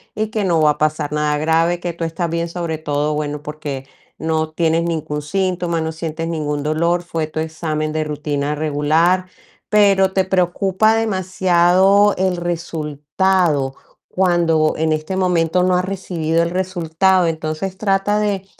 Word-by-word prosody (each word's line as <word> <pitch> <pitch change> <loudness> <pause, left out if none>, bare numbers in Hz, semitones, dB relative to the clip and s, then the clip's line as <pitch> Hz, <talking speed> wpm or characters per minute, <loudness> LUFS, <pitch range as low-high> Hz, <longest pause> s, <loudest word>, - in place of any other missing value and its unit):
y 215 0 -1
que 215 -1 -2
no 170 -4 +2
va 150 -1 +5
a - - -4
pasar 150 -1 -1
nada 150 -1 0
grave, 165 +3 +1
que 175 -1 -4
tú 170 - -6
estás 165 +1 -2
bien, 170 0 -2
sobre 170 -2 -3
todo, 150 -1 -1
bueno, 150 -1 -3
porque 145 -3 -6 0.3
no 160 0 -1
tienes 165 0 +1
ningún 155 -3 -3
síntoma, 175 +1 -1
no 160 0 -3
sientes 165 0 -4
ningún 150 -3 -2
dolor, 170 +4 0
fue 165 -3 -3
tu 155 - -5
examen 155 -1 -3
de 155 0 0
rutina 150 -1 -2
regular, 155 +5 +1 0.4
pero 195 -2 +4
te 190 -1 +1
preocupa 190 +3 +2
demasiado 190 -1 +3
el 185 -1 +1
resultado 165 -2 -1 0.4
cuando 170 -4 +2
en 160 0 0
este 155 +4 -2
momento 180 -1 +1
no 180 0 +3
has 180 - 0
recibido 170 -4 -1
el 170 - -1
resultado. 180 0 +1
Entonces, 160 +4 -3
trata 205 +1 +1
de 200 -2 -1
165 Hz, 155 wpm, -19 LUFS, 155-185 Hz, 0.4 s, va